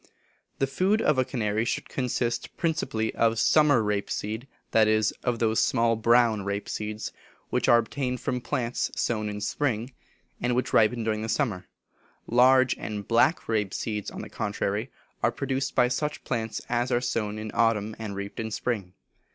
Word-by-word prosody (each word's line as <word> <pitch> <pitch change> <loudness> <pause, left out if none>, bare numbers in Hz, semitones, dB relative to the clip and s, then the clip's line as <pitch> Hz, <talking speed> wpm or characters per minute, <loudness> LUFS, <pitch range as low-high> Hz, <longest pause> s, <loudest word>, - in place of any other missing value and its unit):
The 135 - +2
food 185 +10 +1
of 150 -9 +2
a - - +4
canary 110 -4 -1
should 120 - -2
consist 120 -2 -2
principally 155 -9 -1
of 115 0 +2
summer 145 -1 +4
rape 105 -1 -1
seed 110 +5 -4 0.2
that 110 -1 +5
is, 110 0 +3
of 120 -2 0
those 110 -1 +2
small 115 -2 +2
brown 115 -2 +3
rape 100 +1 -3
seeds 105 0 -4 0.4
which - - +1
are 120 - +8
obtained 125 +2 -2
from 125 -1 -2
plants 125 -3 -1
sown 110 -3 -1
in 105 - -4
the 105 - -6
spring, 125 -1 -1 0.5
and 120 0 +1
which 125 - -1
ripen 115 +1 +4
during 110 -1 -1
the 110 - -4
summer; 110 -5 -1 0.6
large 130 +2 +5
and 105 -2 -5
black 120 +8 +3
rape 105 -3 0
seeds, 105 -3 -3
on - - -7
the - - -9
contrary, 105 +3 -2 0.3
are - - +3
produced 135 0 -2
by 125 - +5
such 150 +4 -2
plants 115 -3 -3
as 120 +1 0
are 120 - +3
sown 115 -4 -2
in 110 0 -5
autumn 110 -2 +1
and 105 -3 -5
reaped 100 0 -6
in 110 -1 -2
spring. 105 -5 -3
115 Hz, 175 wpm, -27 LUFS, 110-125 Hz, 0.6 s, are